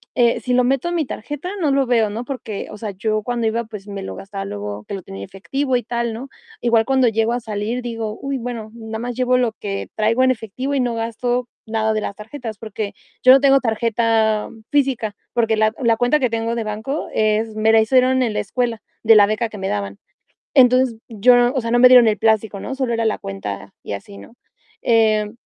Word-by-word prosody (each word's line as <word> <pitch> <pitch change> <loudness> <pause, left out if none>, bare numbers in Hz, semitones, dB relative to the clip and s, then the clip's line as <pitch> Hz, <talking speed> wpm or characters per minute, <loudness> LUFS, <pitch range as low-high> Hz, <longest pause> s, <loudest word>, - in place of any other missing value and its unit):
eh, 235 -1 +3
si 250 - -1
lo 250 - +4
meto 270 +6 +1
en 345 - -2
mi 320 -4 0
tarjeta, 295 +9 -6
no 295 -4 +2
lo 275 0 +2
veo, 230 -4 +2
¿no? 225 +4 -4
Porque, 235 -6 -5
o - - -8
sea, 210 -1 -5
yo 215 +2 -2
cuando 240 -1 -1
iba, 230 +1 0
pues 210 -2 -10
me 200 -1 -6
lo - - -6
gastaba 195 0 -6
luego 105 0 -6
que - - -7
lo 195 - -4
tenía 95 0 -8
efectivo 260 - -2
y 245 - -4
tal, 235 0 -2
¿no? 240 +5 -7 0.3
Igual 230 -2 +3
cuando 265 -2 +3
llego 225 0 +1
a 245 - -1
salir 220 +2 -3
digo: 225 -3 -4
"Uy, 275 0 -2
bueno, 235 -3 -6
nada 220 -1 -7
más 245 0 -4
llevo 255 0 +2
lo 245 -3 +1
que 200 -2 -5
traigo 225 +4 +2
en 260 - +4
efectivo 255 +4 -4
y 275 - +1
no 240 -2 -1
gasto 240 +2 -2 0.2
nada 220 0 0
de 215 - -1
las 200 - -4
tarjetas", 220 0 -7
porque 215 -1 -5 0.3
yo 255 - +8
no 270 - +8
tengo 275 0 +5
tarjeta 225 -2 +1 0.2
física, 260 -7 0 0.2
porque 225 -2 +2
la 215 0 +2
la 230 -2 +3
cuenta 245 +6 +2
que 255 -4 +1
tengo 230 +1 -2
de 230 -2 -3
banco 220 +8 -3
es 215 0 +1
me 215 +1 +3
la 225 - +6
hicieron 255 +3 +3
en 235 -4 0
la - - -1
escuela 235 +1 -2 0.2
de 225 0 +7
la 205 -1 +8
beca 215 +2 -1
que 215 - -10
me 190 -1 -3
daban. 100 -1 -3 0.6
Entonces 255 -3 +5
yo 245 +2 +4
o 260 - 0
sea, 230 - -3
no 240 - +3
me 250 - +9
dieron 250 -2 +7
el 215 - 0
plástico, 220 -2 +1
¿no? 265 - -5
Solo 260 -3 -1
era 230 0 0
la 220 - +1
cuenta 100 0 -6
y - - -6
así, 100 0 -8
¿no? 100 - -13 0.5
Eh, 215 -2 +2
225 Hz, 230 wpm, -20 LUFS, 215-250 Hz, 0.6 s, me